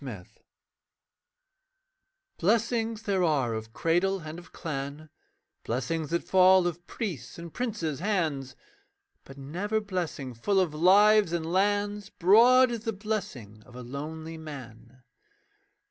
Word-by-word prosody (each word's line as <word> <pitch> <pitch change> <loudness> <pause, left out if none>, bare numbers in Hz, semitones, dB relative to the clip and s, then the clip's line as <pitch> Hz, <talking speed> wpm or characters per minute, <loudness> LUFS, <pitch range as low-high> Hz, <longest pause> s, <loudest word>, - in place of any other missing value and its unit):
ALONE 105 -10 -7 2.1
Blessings 225 +2 0
there 195 -4 0
are 140 -8 +1
of 110 0 -6
cradle 175 +8 0
and 155 +2 -8
of 175 - -16
clan, 150 -1 -6 0.5
Blessings 140 +6 -2
that 170 0 -1
fall 185 -1 +5
of 175 0 -4
priests' 170 - -5
and 170 -1 -9
princes' 170 - -3
hands; 160 -9 -1 0.7
But 135 - -13
never 180 +11 -2
blessing 175 -10 -4
full 190 - +1
of 175 -5 +1
lives 200 +4 +5
and 170 -2 -1
lands, 205 +3 0
Broad 240 +7 +5
as 235 - -3
the 225 +1 -3
blessing 180 - -5
of 120 - -17
a 125 - -8
lonely 160 +5 -7
man. 130 -4 -11
170 Hz, 125 wpm, -28 LUFS, 140-205 Hz, 2.1 s, fall